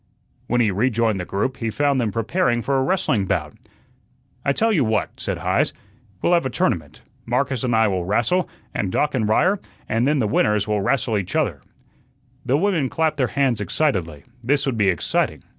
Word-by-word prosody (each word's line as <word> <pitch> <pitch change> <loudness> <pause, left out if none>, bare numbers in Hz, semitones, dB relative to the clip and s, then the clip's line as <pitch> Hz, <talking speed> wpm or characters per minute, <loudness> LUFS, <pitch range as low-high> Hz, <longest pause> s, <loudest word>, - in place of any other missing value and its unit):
When 120 0 +2
he 110 -3 +2
rejoined 115 0 +1
the 90 - -4
group, 130 +9 -2
he 115 - -2
found 140 +2 +1
them 110 -3 -1
preparing 120 - 0
for 140 - 0
a 135 - +2
wrestling 135 - +1
bout. 80 -6 -1 0.9
"I 140 - +2
tell 225 +10 +1
you 155 -9 +3
what," 110 -3 0
said - - -3
Heise, - - 0 0.5
"we'll 175 - +3
have 170 - +4
a - - -3
tournament. 120 - -2 0.2
Marcus 130 0 0
and 120 -2 +1
I 110 0 +4
will 95 -3 -1
rastle, 120 - +1 0.2
and 95 - -2
Doc 150 - +1
and 110 -5 0
Ryer, 185 - +3 0.3
and 115 +3 +1
then 150 +1 +2
the 125 - +1
winners 105 0 +1
will 105 -1 0
rastle 110 0 +1
each 95 - -5
other." - - 0 0.8
The 135 +1 +2
women 165 -6 +1
clapped 160 -2 0
their 130 -3 +2
hands 130 -5 0
excitedly. 95 - -1 0.2
This 140 +4 +1
would 135 -3 -1
be 105 -3 +2
exciting. 90 -4 -1
120 Hz, 190 wpm, -22 LUFS, 105-140 Hz, 0.9 s, have